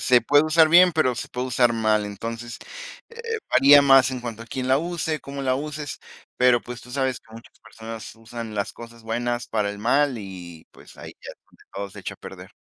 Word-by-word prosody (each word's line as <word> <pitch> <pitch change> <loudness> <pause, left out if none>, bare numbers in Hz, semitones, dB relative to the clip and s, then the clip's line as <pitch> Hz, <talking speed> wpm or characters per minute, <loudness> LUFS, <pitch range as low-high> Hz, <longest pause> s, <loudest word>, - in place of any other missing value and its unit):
Se 125 -1 +4
puede 145 +5 +4
usar 155 0 +4
bien, 180 +2 +7
pero 155 -6 +1
se 120 - -6
puede 125 +1 -4
usar 120 -1 +3
mal. 110 -2 +1
Entonces, 115 +3 -7 0.5
eh, 465 -1 -5
varía 140 +2 +7
más 135 -2 +6
en 130 -1 -5
cuanto 115 -2 -7
a - - -14
quién 130 +2 -4
la 130 +1 +4
use, 160 -2 -3
cómo 140 0 -7
la 130 -1 +1
uses, 145 +1 -5 0.4
pero 125 -1 +4
pues 125 0 -8
tú 125 - -14
sabes 130 -1 -1
que - - -25
muchas 115 - -15
personas 115 -1 -10
usan 115 0 -8
las 100 0 -3
cosas 115 0 -13
buenas 120 +2 -3
para 105 -2 -1
el 100 - -5
mal 140 +4 +1
y, 90 -6 -10
pues, - - -17
ahí - - -10
ya - - -8 0.4
todo 100 0 -5
se - - -11
echa - - -6
a - - -22
perder. - - -11
125 Hz, 215 wpm, -23 LUFS, 115-140 Hz, 0.5 s, bien